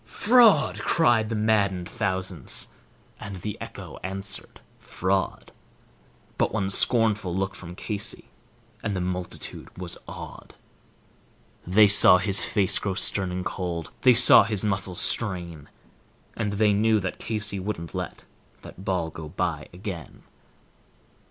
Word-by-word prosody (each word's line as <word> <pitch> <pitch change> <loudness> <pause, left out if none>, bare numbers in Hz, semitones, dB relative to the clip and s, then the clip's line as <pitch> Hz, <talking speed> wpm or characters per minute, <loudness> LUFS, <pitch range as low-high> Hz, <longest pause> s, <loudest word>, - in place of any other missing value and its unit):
"Fraud," 235 -1 +3
cried 120 -9 +1
the 115 - -3
maddened 100 -4 0
thousands, 95 -5 -4 0.5
and 100 -2 -8
the 100 +3 -6
echo - - -10
answered 95 +2 -5 0.2
"Fraud," 95 +1 -3 0.9
But - - 0
one 95 -3 -2
scornful 105 -5 +5
look 95 0 -3
from 90 0 -11
Casey, 105 +2 -3 0.5
and 105 -2 -4
the - - -3
multitude 90 0 -6
was 90 -2 -4
awed. - - -11 1.1
The 105 +4 +5
saw 100 -2 +8
his 100 +3 +4
face 100 -4 +2
grow 95 -2 -4
stern 95 0 +2
and 90 0 -5
cold; 85 -3 -5
they 125 -2 +5
saw 125 - +9
his 105 -3 -1
muscles 95 -3 -2
strain, 85 -8 -2 0.7
And 105 -2 -3
they 105 0 +1
knew 110 +1 +1
that 95 -2 -6
Casey 105 -3 -4
wouldn't 90 -5 -6
let - - -7 0.4
that 95 - -13
ball 90 -4 -3
go 80 -1 -10
by - - -4
again. 90 -2 -9
95 Hz, 130 wpm, -24 LUFS, 90-105 Hz, 1.1 s, saw